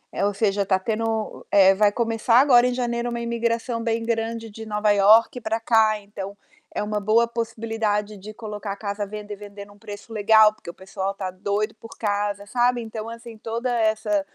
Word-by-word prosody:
eh, 200 Hz, -, -1 dB
ou 205 Hz, -, +1 dB
seja, 200 Hz, -1 st, +1 dB
tá 190 Hz, -1 st, +2 dB
tendo 220 Hz, +2 st, -3 dB
é, 195 Hz, -1 st, +6 dB
vai 205 Hz, +1 st, +4 dB
começar 230 Hz, +1 st, +2 dB
agora 250 Hz, -3 st, +6 dB
em 250 Hz, -, -2 dB
janeiro 240 Hz, -1 st, -2 dB
uma 235 Hz, -, -3 dB
imigração 235 Hz, 0 st, -1 dB
bem 230 Hz, 0 st, -1 dB
grande 225 Hz, 0 st, -2 dB
de 220 Hz, +1 st, -9 dB
Nova 210 Hz, -1 st, +1 dB
York 220 Hz, +5 st, +5 dB
pra 220 Hz, 0 st, -1 dB
cá, 220 Hz, -2 st, +3 dB
então 200 Hz, -1 st, -8 dB, 0.4 s
é -, -, -1 dB
uma 210 Hz, 0 st, -2 dB
boa 220 Hz, +3 st, +3 dB
possibilidade 225 Hz, -3 st, -2 dB
de 215 Hz, +3 st, -10 dB
colocar 210 Hz, -3 st, -6 dB
a -, -, -6 dB
casa 205 Hz, 0 st, -4 dB
à -, -, -9 dB
venda 210 Hz, 0 st, -8 dB
e -, -, -5 dB
vender 200 Hz, 0 st, -10 dB
num 205 Hz, 0 st, -19 dB
preço 205 Hz, +1 st, -10 dB
legal, 215 Hz, 0 st, +5 dB
porque 215 Hz, -, -16 dB
o 170 Hz, -, -6 dB
pessoal 195 Hz, +1 st, -4 dB
tá 190 Hz, -2 st, -4 dB
doido 205 Hz, +3 st, -2 dB
por 225 Hz, -, -13 dB
casa, 205 Hz, -1 st, -2 dB
sabe? 245 Hz, +1 st, +1 dB
Então, 220 Hz, 0 st, -6 dB
assim, 230 Hz, -1 st, -10 dB
toda 230 Hz, +3 st, -3 dB
essa 215 Hz, -2 st, +1 dB
215 Hz, 200 wpm, -23 LUFS, 205-230 Hz, 0.4 s, é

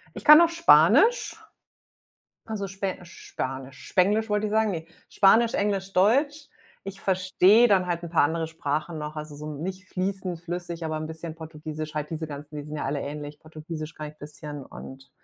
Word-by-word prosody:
Ich -, -, -8 dB
kann 300 Hz, 0 st, +10 dB
noch 340 Hz, 0 st, +6 dB
Spanisch. 340 Hz, +8 st, +5 dB, 1.1 s
Also, 215 Hz, -3 st, -4 dB
Spe 195 Hz, 0 st, -4 dB
Spanisch, 135 Hz, -6 st, -7 dB
Spenglisch 210 Hz, +4 st, +2 dB
wollte 210 Hz, 0 st, 0 dB
ich -, -, -4 dB
sagen, 220 Hz, 0 st, +2 dB
ne. 160 Hz, -1 st, -5 dB, 0.2 s
Spanisch, 225 Hz, +4 st, +4 dB
Englisch, 195 Hz, -1 st, -1 dB
Deutsch. 280 Hz, +10 st, +2 dB, 0.4 s
Ich 195 Hz, 0 st, -7 dB
verstehe 190 Hz, +4 st, +4 dB
dann 190 Hz, -3 st, +3 dB
halt 175 Hz, -1 st, -2 dB
'n 170 Hz, -, -7 dB
paar 165 Hz, -, +4 dB
andere 160 Hz, +2 st, -1 dB
Sprachen 160 Hz, 0 st, -3 dB
noch. 150 Hz, 0 st, -6 dB
Also, 150 Hz, 0 st, -7 dB
so 150 Hz, +1 st, -8 dB
nicht 185 Hz, +5 st, -6 dB
fließend 185 Hz, -2 st, -3 dB
flüssig, 175 Hz, -1 st, -5 dB
aber 155 Hz, -1 st, -2 dB
'n 155 Hz, 0 st, -4 dB
bisschen 160 Hz, 0 st, -7 dB
Portugiesisch, 155 Hz, -1 st, -7 dB
halt 150 Hz, -1 st, -3 dB
diese 160 Hz, -1 st, -4 dB
ganzen 150 Hz, +1 st, -9 dB
die 145 Hz, -, -6 dB
sind 150 Hz, +1 st, -7 dB
ja -, -, -3 dB
alle 140 Hz, +1 st, -2 dB
ähnlich. 145 Hz, +1 st, -6 dB
Portugiesisch 155 Hz, 0 st, -8 dB
kann 155 Hz, -1 st, -6 dB
ich 150 Hz, -, -13 dB
'n -, -, -39 dB
bisschen 145 Hz, -1 st, -8 dB
und 135 Hz, 0 st, -11 dB
165 Hz, 185 wpm, -26 LUFS, 150-195 Hz, 1.1 s, kann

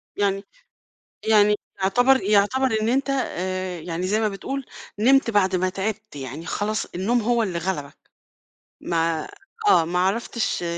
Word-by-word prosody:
يعني 195 Hz, -1 st, 0 dB, 0.8 s
يعني 210 Hz, -1 st, +5 dB, 0.3 s
يُعتبر 245 Hz, +7 st, +4 dB
يُعتبر 210 Hz, +6 st, +3 dB
إن 220 Hz, -, +1 dB
أنت، 270 Hz, +3 st, +1 dB
آآ، 185 Hz, -8 st, -2 dB
يعني 170 Hz, +2 st, -3 dB
زي 210 Hz, +3 st, +1 dB
ما 220 Hz, -, +2 dB
بتقول 270 Hz, +7 st, -5 dB, 0.3 s
نمت 265 Hz, +3 st, +4 dB
بعد 190 Hz, -3 st, +2 dB
ما 185 Hz, +1 st, +1 dB
تعبت، 215 Hz, +1 st, -4 dB
يعني 140 Hz, +4 st, -7 dB
خلاص 215 Hz, +4 st, -2 dB
النوم 225 Hz, +7 st, 0 dB
هو 235 Hz, +1 st, +2 dB
اللي 185 Hz, -5 st, -2 dB
غلبك 155 Hz, -5 st, -4 dB, 0.8 s
ما 165 Hz, -1 st, 0 dB, 0.4 s
آه، 165 Hz, -, +5 dB
ما 175 Hz, +2 st, -1 dB
عرفتش 210 Hz, +2 st, -1 dB
200 Hz, 140 wpm, -23 LUFS, 180-230 Hz, 0.8 s, يعني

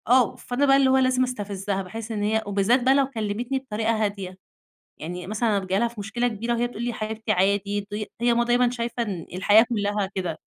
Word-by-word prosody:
آه، 250 Hz, 0 st, +4 dB
فأنا 250 Hz, +3 st, -1 dB
بقى 270 Hz, -1 st, +5 dB
اللي 270 Hz, -1 st, +4 dB
هو 265 Hz, -, +4 dB
لازم 255 Hz, -1 st, +3 dB
استفزَّها، 200 Hz, -5 st, -3 dB
باحِس 220 Hz, +4 st, -7 dB
إن 210 Hz, -2 st, -2 dB
هي 220 Hz, +1 st, +1 dB
وبالذات 205 Hz, +5 st, +2 dB
بقى 260 Hz, +2 st, +5 dB
لو 275 Hz, -1 st, +3 dB
كلَّمتني 240 Hz, +2 st, -2 dB
بطريقة 225 Hz, -3 st, -1 dB
هادية، 195 Hz, -3 st, -5 dB, 0.6 s
يعني 180 Hz, +2 st, -6 dB
مثلًا 215 Hz, 0 st, +1 dB
ابقى 190 Hz, -1 st, -4 dB
جاية 190 Hz, +1 st, +1 dB
ليها 235 Hz, -, +2 dB
في 235 Hz, -2 st, -10 dB
مشكلة 220 Hz, +4 st, -1 dB
كبيرة 235 Hz, +1 st, -2 dB
وهي 240 Hz, +1 st, 0 dB
تقول 240 Hz, -2 st, -8 dB
لي: 240 Hz, -, -1 dB
"يا -, -, -3 dB
حبيبتي 220 Hz, 0 st, -3 dB
عادي." 200 Hz, +1 st, +1 dB
ض -, -, -1 dB, 0.3 s
هي 240 Hz, 0 st, +3 dB
ماما 240 Hz, 0 st, +2 dB
دايمًا 245 Hz, +1 st, +3 dB
شايفة 240 Hz, 0 st, -3 dB
إن 190 Hz, -7 st, -5 dB
الحياة 205 Hz, +5 st, +5 dB
كلّها 205 Hz, -3 st, -1 dB
كده. 175 Hz, -4 st, -3 dB
220 Hz, 220 wpm, -24 LUFS, 200-240 Hz, 0.6 s, بقى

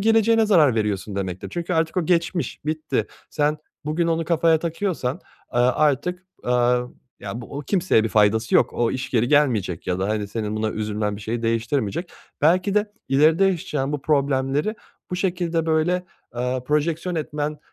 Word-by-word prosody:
geleceğine 225 Hz, +1 st, +4 dB
zarar 155 Hz, -, +5 dB
veriyorsun 105 Hz, -2 st, -2 dB
demektir 95 Hz, -2 st, -4 dB
çünkü 175 Hz, +1 st, -3 dB
artık 160 Hz, 0 st, 0 dB
o 180 Hz, -, +1 dB
geçmiş, 175 Hz, 0 st, 0 dB
bitti. 155 Hz, 0 st, -1 dB, 0.2 s
Sen 150 Hz, +1 st, 0 dB, 0.3 s
bugün 160 Hz, +3 st, 0 dB
onu 165 Hz, 0 st, 0 dB
kafaya 165 Hz, 0 st, +3 dB
takıyorsan, 165 Hz, -3 st, -2 dB, 0.3 s
eee, -, -, +2 dB
artık, 150 Hz, +8 st, +1 dB, 0.2 s
eee, -, -, -2 dB, 0.7 s
ya, 115 Hz, -, -5 dB
bu 130 Hz, +4 st, -7 dB
o -, -, -3 dB
kimseye 170 Hz, -, +2 dB
bir -, -, 0 dB
faydası 110 Hz, +1 st, +2 dB
yok, -, -, +4 dB
o 120 Hz, -1 st, +1 dB
iş 130 Hz, +1 st, -4 dB
geri 120 Hz, -1 st, +2 dB
gelmeyecek 120 Hz, -, +2 dB
ya 90 Hz, 0 st, -1 dB
da, 95 Hz, +2 st, -1 dB
hani, 105 Hz, -1 st, -1 dB
senin 110 Hz, 0 st, -3 dB
buna 110 Hz, 0 st, 0 dB
üzülmen 105 Hz, -1 st, -2 dB
bir -, -, -10 dB
şeyi 115 Hz, +2 st, -3 dB
değiştirmeyecek. 115 Hz, -, -1 dB, 0.3 s
Belki 185 Hz, +5 st, +3 dB
de 210 Hz, 0 st, +1 dB, 0.2 s
ileride 155 Hz, +7 st, +4 dB
yaşayacağın 150 Hz, -7 st, -1 dB
bu 145 Hz, -, -3 dB
problemleri 140 Hz, +5 st, +1 dB, 0.4 s
bu 180 Hz, -, -2 dB
şekilde 175 Hz, -3 st, -1 dB
böyle, 165 Hz, +3 st, +1 dB, 0.3 s
eee, 125 Hz, +1 st, -1 dB
projeksiyon 160 Hz, +4 st, 0 dB
etmen, 150 Hz, -1 st, -3 dB
150 Hz, 165 wpm, -23 LUFS, 115-170 Hz, 0.7 s, zarar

